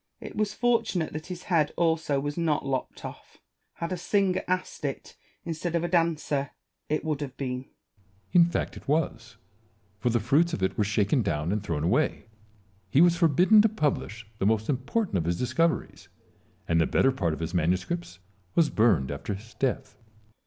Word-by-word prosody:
It - - -9
was 210 -1 -1
for 240 -1 +3
tunate 185 -8 -3
that 155 +1 -6
his 180 -1 -7
head 160 -5 +2
also 160 -4 +1
was 145 +1 -3
not 160 -4 0
lopped 135 -1 -3
off: - - -10 0.4
had 170 - -5
a 185 - -1
singer 190 +1 +1
asked 185 -3 -2
it, 140 -2 -4 0.3
instead 170 +1 -3
of 170 - +1
a - - 0
dancer, 160 -5 0 0.4
it 155 +1 -1
would 150 -2 -1
have 135 -2 -6
been. 130 -1 -3
Salomon. - - -35 0.6
In 175 -1 +7
fact 170 - -2
it - - -12
was; 135 -6 -1 0.6
for 120 - +1
the 120 0 +2
fruits 145 - +2
of 95 - -2
it 95 0 0
were 105 - +1
shaken 105 +5 +1
down 80 -4 -1
and 105 0 0
thrown 80 -7 -3
away: 120 - +1 0.6
he 130 - +3
was 170 +1 +6
forbidden 175 +6 +5
to 220 - +4
publish 145 - -2
the 95 - +2
most 110 0 +1
important 135 - 0
of 80 - -3
his 85 +1 0
discoveries, 165 +6 -1 0.6
and 85 0 +3
the - - +2
better 135 - +3
part 85 -11 -1
of - - -6
his 80 +2 -4
manuscripts 90 - -1 0.4
was 165 -3 +3
burned 105 - +3
after 70 +8 -4
his 110 +4 -12
death. 135 -2 -2
145 Hz, 190 wpm, -27 LUFS, 105-170 Hz, 0.6 s, In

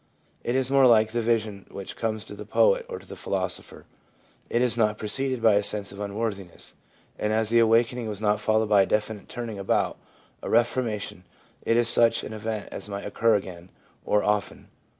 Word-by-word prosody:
It 120 - -1
is 130 0 +1
more 135 -1 +6
like 110 -2 +5
the 120 +1 -1
vision 110 -4 -1
which 100 - -7
comes 110 -2 -3
to - - -9
the 105 +1 -8
poet - - +2
or 470 - -5
to - - -14
the - - -9
philosopher; - - -3 0.6
it 120 - +1
was 120 -1 +3
not 105 -2 +1
preceded 130 +4 -2
by 110 - +6
a 100 - +4
sense 100 -1 -2
of 100 - -11
unworthiness, 100 -3 -4 0.5
and 105 - 0
as 110 0 +1
the 115 +1 +4
awak 115 +1 +4
ening 125 -2 -5
was 105 -2 -5
not 105 -1 +1
followed 110 +1 +1
by 105 -2 +6
a - - +3
definite 105 -1 -2
turning 115 -4 -5
about, 100 - 0 0.4
a - - -5
reformation, 115 -5 0 0.4
it 115 - +1
is 120 -1 +3
such 115 0 +5
an - - -6
event 110 -1 -4
as - - -6
might 100 0 -5
occur 115 +2 +2
again, 90 -3 -5 0.3
or 105 0 +1
often. 105 -2 -1
110 Hz, 200 wpm, -26 LUFS, 105-115 Hz, 0.6 s, more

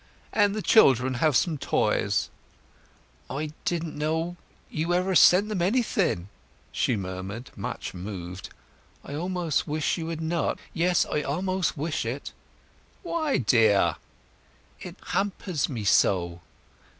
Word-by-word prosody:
"And 205 -1 +3
the 215 - -3
children 130 - +5
have 145 +3 +2
some 160 -5 0
toys." - - 0 1.0
"I 150 +3 -3
didn't 165 -2 -2
know—you 160 +1 -3
ever 185 +1 +1
sent 185 +3 +6
them 210 -5 -2
anything!" 190 - +1 0.4
she 125 - +1
murmured, 95 +4 -6
much - - -5
moved. 90 -1 -7 0.6
"I - - -7
almost 175 0 -1
wish 155 +3 -1
you 160 - -4
had 165 -1 -4
not—yes, 170 +1 0
I 150 - -1
almost 180 +4 -1
wish 150 +2 -2
it!" 120 +5 -5 0.7
"Why, 325 -5 0
dear?" 110 -4 +3 0.8
"It—hampers 190 -6 -2
me 120 -6 -4
so." 90 -3 +2
155 Hz, 115 wpm, -26 LUFS, 120-180 Hz, 1.0 s, sent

